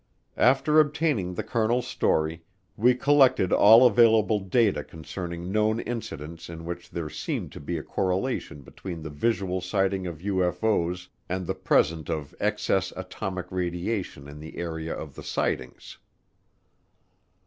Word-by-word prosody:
After 145 +4 +4
obtaining 145 - +1
the 110 - -3
colonel's 115 +2 0
story, 80 +2 0 0.3
we 125 +3 +4
collected 130 -7 +4
all 115 +5 +8
available 110 -2 +5
data 100 +2 +1
concerning 85 +2 -6
known 110 +2 +2
incidents 85 -10 -6
in 80 -1 -8
which 85 +1 -6
there 85 -2 -4
seemed - - -4
to - - -9
be 80 +4 -3
a 75 - -5
correlation 95 - -2
between 85 +2 -8
the 80 - -6
visual 95 +3 -1
sighting 95 0 0
of 85 -3 -6
UFO's 90 0 0 0.2
and 90 0 -2
the - - -1
presence 80 -1 +1
of 75 -4 -3
excess - - 0
atomic 95 -2 -5
radiation 90 -3 -3
in 75 +1 -10
the 80 +1 -10
area 80 -1 -4
of - - -8
the - - -10
sightings. 65 0 -3
90 Hz, 135 wpm, -26 LUFS, 85-110 Hz, 0.3 s, all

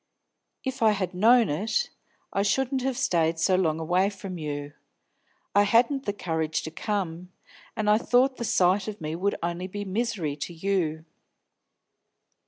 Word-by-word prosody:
If 265 -1 -4
I 220 -2 +5
had 190 -2 -2
known 230 +5 +5
it, 215 - -1 0.4
I 195 - +1
shouldn't 260 +6 +1
have 260 -1 -1
stayed 165 -1 +1
so 185 +3 +3
long 165 -4 +1
away 180 +4 +2
from 195 -3 -7
you; 145 -1 -5 0.8
I 205 - +6
hadn't 235 +6 +3
the - - +2
courage 160 -5 -2
to 160 - -6
come, 180 -2 -3 0.4
and 215 -1 -2
I 210 +1 +5
thought 255 +2 +2
the - - -4
sight 190 -2 +2
of 215 -1 -5
me 155 0 -4
would 200 +4 0
only 175 +2 -2
be 205 +2 -5
misery 195 -7 -2
to 160 +4 -5
you. 165 -3 -1
195 Hz, 160 wpm, -26 LUFS, 165-220 Hz, 0.8 s, I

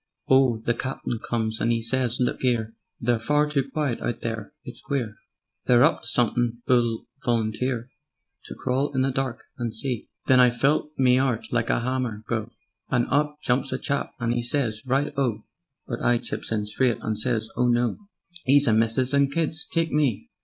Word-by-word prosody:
"Oh, 130 -3 +4
the 115 +2 -1
Captain 125 -2 -4
comes 110 -1 -2
and 115 - +2
'e 115 - +1
says: 125 0 +1
'Look 125 +1 -1
'ere! 115 -3 +1 0.3
They're 120 0 +1
far 150 +6 +2
too 140 -2 -1
quiet 140 -4 -2
out 120 - -3
there: 115 +1 -4
it's - - -8
queer. 125 -7 -2 0.5
They're 120 0 +6
up 160 +3 +3
to - - -7
somethin' 120 0 0
'oo'll 120 -3 +2 0.2
volunteer 120 +1 0 0.6
To - - -8
crawl 135 +3 -1
in 130 - +2
the 135 - +1
dark 130 -2 -3 0.2
and 120 -1 -2
see?' 125 -1 -3 0.2
Then 130 -1 +5
I 125 -1 +7
felt 135 +5 +1
me 130 -1 +4
'eart 130 -4 0
like 120 -1 0
a - - +3
'ammer 125 -4 -2
go, 110 -1 -2 0.4
And 120 -2 +2
up 150 +1 +2
jumps 130 +2 +1
a 130 - -1
chap 140 +2 -2
and 115 0 0
'e 120 - 0
says: 120 -3 -1
'Right 140 +3 +1
O!' 125 -6 0 0.4
But - - -5
I 120 0 +3
chips - - -5
in 105 -2 0
straight, 120 +3 +1
and 110 - -2
I - - -6
says 110 -2 -1
'Oh 125 - +2
no! 120 0 +1 0.5
'E's 140 +1 +6
a 110 - +4
missis 115 +4 +2
and 140 -1 +3
kids 160 +1 +1
take 165 -1 +1
me.' 145 -8 0
125 Hz, 195 wpm, -25 LUFS, 115-135 Hz, 0.6 s, I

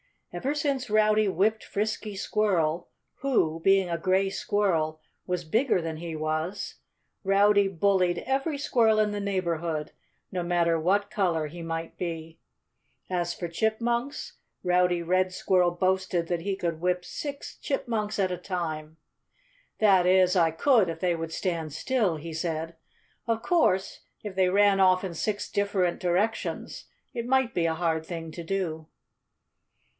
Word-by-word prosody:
Ever 280 +3 -2
since 275 -4 -1
Rowdy 215 0 +3
whipped 205 +4 +1
Frisky 215 0 -3
Squirrel, 180 -6 0 0.3
who 165 -13 +1
(being 195 +1 +3
a 170 -1 -2
gray 190 +3 +2
squirrel) 165 -8 0 0.3
was 180 -1 -1
bigger 220 - +2
than 160 -1 -4
he 165 0 -5
was, 155 +5 -3 0.5
Rowdy 200 +1 +4
bullied 185 -1 +2
every 275 +3 0
squirrel 230 -6 +3
in 215 -1 +2
the 205 - -3
neighborhood 170 -6 -2 0.4
no 185 - -2
matter 170 -1 +1
what 200 +5 +1
color 170 -7 0
he 170 +3 -9
might 165 0 -5
be. 165 -2 -5 0.7
As 175 -1 0
for 175 - -5
chipmunks, 235 - -1 0.3
Rowdy 180 -1 +2
Red 185 +2 +1
Squirrel 180 -1 +2
boasted 185 -1 0
that 175 -2 -1
he 195 +2 -2
could 170 -4 -3
whip 180 0 0
six 285 -1 -6
chipmunks 220 -6 -2
at 190 -2 +1
a 180 - -2
time. 160 -4 -4 0.8
"That 190 -4 +5
is, 185 0 +4
I 165 -2 +4
could 210 - +3
if 165 0 -5
they 180 -2 +2
would 165 -1 -4
stand 165 -5 -2
still," 215 - 0
he 160 +1 -7
said. 165 0 -3 0.5
"Of 225 -1 0
course, 195 - +2 0.2
if 210 -2 -5
they 185 -1 +3
ran 200 +1 +4
off 185 0 +4
in 185 -3 -4
six 205 +5 -2
different 200 -3 0
directions 185 +5 -1 0.3
it 235 -2 -4
might 265 -2 +2
be 170 - +1
a 160 - 0
hard 160 -1 0
thing 165 -1 -6
to 170 - -7
do." 165 -4 -3
185 Hz, 150 wpm, -27 LUFS, 165-210 Hz, 0.8 s, That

